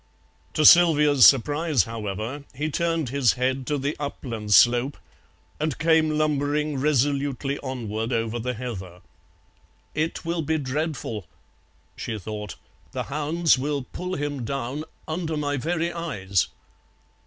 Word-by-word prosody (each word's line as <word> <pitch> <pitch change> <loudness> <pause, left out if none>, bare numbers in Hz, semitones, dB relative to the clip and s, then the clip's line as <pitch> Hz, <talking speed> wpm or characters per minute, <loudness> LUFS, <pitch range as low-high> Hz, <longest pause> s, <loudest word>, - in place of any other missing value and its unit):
To 155 - +3
Sylvia's 150 -6 +7
surprise, 145 - +3
however, 110 +5 -5
he 150 +4 -2
turned 165 -3 0
his 130 -3 +3
head 130 +1 -1
to 150 - 0
the 140 +2 -2
upland 115 -7 -5
slope 120 +5 +5 0.6
and 155 -3 -1
came 155 -1 +3
lumbering 150 -1 0
resolutely 140 0 0
onward 115 -4 -4
over 115 0 -1
the 125 +2 -3
heather. 95 -7 -7 0.9
"It 160 +2 -2
will 170 0 -1
be 160 +1 0
dreadful," 135 - -3 0.7
she 110 - -4
thought, 105 +1 -6 0.4
"the - - -2
hounds 155 0 +2
will 140 0 -2
pull 180 +1 -4
him 145 -3 -3
down 135 +4 -3 0.2
under 160 -1 -2
my 145 -1 -1
very 170 +4 -1
eyes." 100 - -1
140 Hz, 125 wpm, -25 LUFS, 120-155 Hz, 0.9 s, Sylvia's